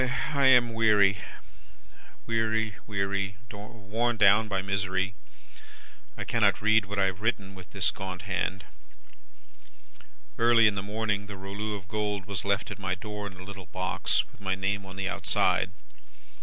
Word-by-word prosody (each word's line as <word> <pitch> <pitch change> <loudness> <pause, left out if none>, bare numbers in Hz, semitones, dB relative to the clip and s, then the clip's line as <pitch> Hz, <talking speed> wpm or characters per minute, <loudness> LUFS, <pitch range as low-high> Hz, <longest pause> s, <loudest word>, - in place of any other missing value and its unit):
"I 140 -2 +4
am 120 -3 +6
weary, 105 -3 +4 1.1
weary, 110 -1 0
weary 100 -2 -1
worn 110 +3 -3
down 105 +1 +6
by 100 -2 -1
misery. 95 -1 -1 1.0
I - - -3
cannot - - +2
read 110 0 +4
what 100 +2 -5
I 100 - +4
have 95 +1 -2
written 100 -4 -1
with 95 -1 -12
this 95 -1 +1
gaunt 95 -2 -6
hand. 95 0 -2 1.8
"Early 115 -1 +6
in 105 - +5
the 100 - -3
morning, 105 0 -2
the 100 -1 -8
rouleau 100 +2 -4
of 95 -3 -9
gold 105 -2 -2
was 100 -2 -3
left 100 0 0
at - - -7
my 95 -2 -1
door 105 +1 -6
in 95 -2 -11
a 90 - -9
little 95 -2 -9
box, 95 +3 0
with - - -20
my 95 -1 0
name 95 +1 -2
on 95 - -9
the 95 0 -2
outside. - - +1
100 Hz, 155 wpm, -28 LUFS, 95-110 Hz, 1.8 s, am